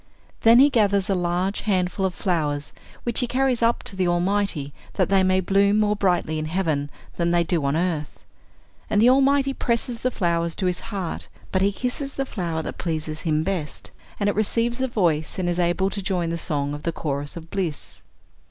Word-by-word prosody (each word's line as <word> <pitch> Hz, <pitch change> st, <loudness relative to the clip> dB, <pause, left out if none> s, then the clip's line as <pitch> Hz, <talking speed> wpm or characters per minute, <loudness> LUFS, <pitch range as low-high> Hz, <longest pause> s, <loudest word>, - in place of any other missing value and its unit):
Then 230 Hz, +1 st, +7 dB
he 280 Hz, +3 st, +7 dB
gathers 200 Hz, -4 st, +2 dB
a -, -, +4 dB
large 180 Hz, +2 st, -1 dB
handful 190 Hz, -1 st, 0 dB
of 180 Hz, -, -7 dB
flowers, 150 Hz, -6 st, -1 dB, 0.3 s
which 240 Hz, -, 0 dB
he 250 Hz, -, 0 dB
carries 255 Hz, -1 st, +1 dB
up 230 Hz, +1 st, +2 dB
to -, -, -4 dB
the 185 Hz, -1 st, +1 dB
Almighty, 175 Hz, -4 st, 0 dB, 0.2 s
that 185 Hz, -4 st, +1 dB
they 195 Hz, -1 st, +4 dB
may 185 Hz, 0 st, +3 dB
bloom 200 Hz, +3 st, +3 dB
more 210 Hz, 0 st, +2 dB
brightly 175 Hz, -5 st, 0 dB
in 155 Hz, -, -3 dB
heaven 155 Hz, -4 st, -1 dB, 0.3 s
than 170 Hz, -1 st, +1 dB
they 170 Hz, 0 st, +3 dB
do 165 Hz, -2 st, 0 dB
on 140 Hz, +2 st, +1 dB
earth. 165 Hz, -4 st, -2 dB, 0.7 s
And 205 Hz, -, +2 dB
the 240 Hz, +4 st, +6 dB
Almighty 275 Hz, +1 st, +3 dB
presses 235 Hz, -1 st, -1 dB
the 255 Hz, -, +1 dB
flowers 170 Hz, -6 st, 0 dB
to 190 Hz, -, -2 dB
His 180 Hz, -1 st, 0 dB
heart, 195 Hz, -6 st, -5 dB, 0.2 s
but 190 Hz, -, +1 dB
He 200 Hz, +1 st, +3 dB
kisses 255 Hz, +6 st, -2 dB
the 270 Hz, -, -1 dB
flower 170 Hz, -9 st, -3 dB
that -, -, -6 dB
pleases 155 Hz, -2 st, -3 dB
Him 155 Hz, -2 st, +1 dB
best, 175 Hz, -5 st, -4 dB, 0.3 s
and 205 Hz, -, +1 dB
it 205 Hz, -, +2 dB
receives 230 Hz, +4 st, 0 dB
a 260 Hz, -, +1 dB
voice, 170 Hz, -10 st, 0 dB
and 185 Hz, -2 st, -1 dB
is 175 Hz, 0 st, 0 dB
able 180 Hz, +3 st, +1 dB
to 200 Hz, -, -3 dB
join 180 Hz, -3 st, -1 dB
the -, -, -1 dB
song 145 Hz, -3 st, -2 dB
of 145 Hz, -, -6 dB
the 170 Hz, -, -1 dB
chorus 145 Hz, -1 st, -4 dB
of 165 Hz, 0 st, -10 dB
bliss." 175 Hz, -7 st, -4 dB
185 Hz, 205 wpm, -23 LUFS, 165-210 Hz, 0.7 s, Then